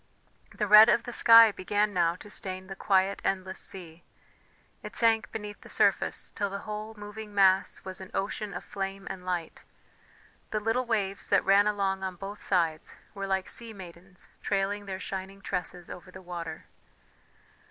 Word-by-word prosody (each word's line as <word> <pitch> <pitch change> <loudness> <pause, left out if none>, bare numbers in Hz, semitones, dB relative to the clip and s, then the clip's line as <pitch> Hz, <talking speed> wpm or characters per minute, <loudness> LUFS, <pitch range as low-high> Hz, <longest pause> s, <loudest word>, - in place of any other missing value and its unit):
The 210 - 0
red 215 +2 +9
of 235 - +3
the 245 - -6
sky 230 -2 +8
began 205 +2 0
now 170 -2 +2
to 210 +3 -13
stain 185 -1 -3
the 195 +1 -8
quiet 195 0 +1
endless 190 -1 -2
sea 175 -3 -4 0.8
it - - -9
sank 225 -1 +2
beneath 210 -2 -7
the - - -13
surface - - +1
till 205 -2 -2
the 200 +1 -5
whole 215 +1 -6
moving 210 0 -9
mass 195 -1 +3
was 190 0 -7
an 190 - -9
ocean 205 +1 -3
of - - -5
flame 195 0 -5
and 185 - -8
light; 180 -2 -4 0.9
the 215 - -1
little 225 +4 0
waves 200 -4 -1
that - - +3
ran 200 +1 +5
along 195 -2 0
on 190 -1 -3
both 200 +3 -8
sides 165 -4 0 0.2
were 195 -1 -5
like 190 -1 -1
sea 230 -2 -5
maidens 180 -1 -12
trailing 200 +1 -1
their 190 -1 -4
shining 195 +1 -6
tresses 180 -2 -4
over 180 +1 -10
the 185 - -11
water. 170 -3 -7
195 Hz, 170 wpm, -28 LUFS, 185-210 Hz, 0.9 s, red